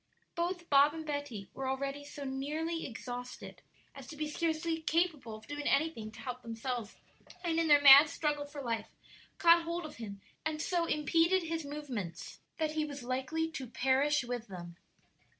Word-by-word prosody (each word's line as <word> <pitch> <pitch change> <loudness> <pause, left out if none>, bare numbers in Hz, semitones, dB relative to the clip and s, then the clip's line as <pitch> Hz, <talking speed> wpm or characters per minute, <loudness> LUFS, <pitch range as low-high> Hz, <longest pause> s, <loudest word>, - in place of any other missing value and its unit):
Both 345 0 -2
Bob 285 +2 +5
and 320 -1 -6
Betty 285 -9 -4
were 265 0 -3
already 275 +2 -3
so 285 0 -8
nearly 300 +5 -3
exhausted 245 +1 -7 0.3
as 275 -3 -10
to 305 - -8
be 305 0 -2
scarcely 325 +1 -1
capable 315 -8 0
of 215 - -12
doing 290 0 -4
anything 275 -8 +1
to 220 - -11
help 250 +1 -5
themselves, 230 -1 -4 0.5
and 330 -2 +1
in 330 - +2
their 290 -1 +6
mad 280 +2 +11
struggle 295 -3 -1
for 285 -1 -8
life 230 -2 -2 0.5
caught 340 0 +6
hold 335 0 -3
of 310 - -9
him 205 -4 -7 0.2
and 310 -1 -2
so 345 +1 0
impeded 330 +4 +2
his 330 -1 -3
movements 260 - -6 0.2
that 315 -1 0
he 310 0 0
was 285 -3 -6
like 255 +1 -2
to 320 -4 -2
perish 270 +4 +2
with 240 -1 -4
them. 175 -3 -8
290 Hz, 170 wpm, -32 LUFS, 250-320 Hz, 0.5 s, mad